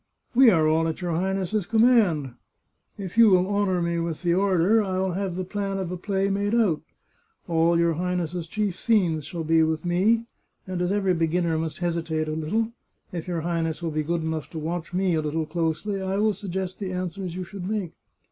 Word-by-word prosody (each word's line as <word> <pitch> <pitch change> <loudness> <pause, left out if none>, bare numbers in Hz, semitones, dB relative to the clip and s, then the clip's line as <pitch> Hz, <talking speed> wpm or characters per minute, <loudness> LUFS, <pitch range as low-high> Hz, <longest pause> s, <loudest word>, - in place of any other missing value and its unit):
" - - -46
We 255 0 +7
are 160 -6 +4
all 160 +1 +2
at 160 - -3
your 175 -1 -2
Highness's 190 +3 -1
command. 220 - +3 0.6
If 200 +2 -4
you 230 -2 +8
will 185 -1 +4
honour 200 -3 +1
me 170 0 0
with 165 0 -3
the 170 -1 +2
order 195 +3 +3
I 190 -3 -2
will 190 0 0
have 190 0 -2
the 185 - -2
plan 195 0 -3
of 185 -2 -3
a - - -2
play 195 +2 -1
made 205 +3 0
out. 205 -10 +2 0.7
All 170 0 +3
your 170 0 +3
Highness's 175 0 -2
chief 205 0 -1
scenes 175 -10 +2
shall 170 +1 -5
be 160 +1 +3
with 160 +1 0
me, 205 +7 +2 0.4
and 185 -1 -3
as 180 +1 0
every 195 -2 +2
beginner 165 0 +1
must 160 -2 -3
hesitate 165 -2 -1
a - - -2
little, 180 +9 -1 0.4
if 170 -1 -5
your 170 -2 -2
Highness 165 0 -2
will 165 - -1
be 155 0 0
good 165 +2 -1
enough 160 -1 -3
to 165 - -8
watch 165 +2 -4
me 185 0 +1
a 160 - +1
little 155 +1 -2
closely, 165 +5 -2
I 190 +1 -1
will 215 +1 +2
sug 200 -1 -8
gest 185 0 -3
the 195 -3 -3
answers 180 0 -4
you 185 - -3
should 190 0 -7
make." 205 -6 -2
180 Hz, 215 wpm, -25 LUFS, 165-195 Hz, 0.7 s, you